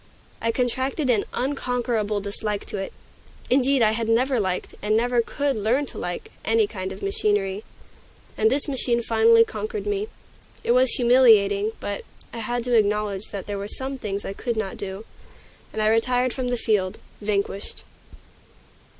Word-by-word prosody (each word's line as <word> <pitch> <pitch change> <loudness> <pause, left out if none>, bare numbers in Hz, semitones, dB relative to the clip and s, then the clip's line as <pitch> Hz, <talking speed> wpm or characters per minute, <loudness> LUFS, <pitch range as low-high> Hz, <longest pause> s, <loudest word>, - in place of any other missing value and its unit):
I 230 - +1
contracted 260 +3 0
an 215 -4 +1
unconquerable 245 -6 -1
dislike 205 +1 -3
to - - -4
it; 195 0 -4 0.6
indeed, 265 -1 +4
I 215 - +5
had 225 0 -2
never 250 +2 +2
liked, 185 -3 -2
and 215 +1 +2
never 240 +1 +2
could 280 +4 -1
learn 225 +7 +1
to - - -7
like, 175 0 -5
any 225 -1 +3
kind 190 -2 -5
of 190 - -9
machinery. 195 0 0 0.7
And 440 - +3
this 285 -4 +1
machine 245 -4 +1
finally 455 - +5
conquered 435 -1 -5
me. 415 0 -1 0.6
It - - +1
was 255 +1 +5
humiliating, 225 -4 +5
but 200 0 -4 0.3
I 235 - -5
had 240 +2 -2
to 245 0 -1
acknowledge 210 -2 +1
that 200 -2 -5
there 205 -1 -4
were 200 - -4
some 265 +4 -4
things 200 -2 -4
I 195 - -4
could 235 +2 -3
not 205 -3 -2
do, 195 +2 -6 0.7
and 215 - -2
I - - +3
retired 245 +2 +2
from 255 -2 -3
the 245 0 0
field, 205 -4 0 0.2
vanquished. 200 -1 -2
225 Hz, 165 wpm, -24 LUFS, 205-255 Hz, 0.7 s, I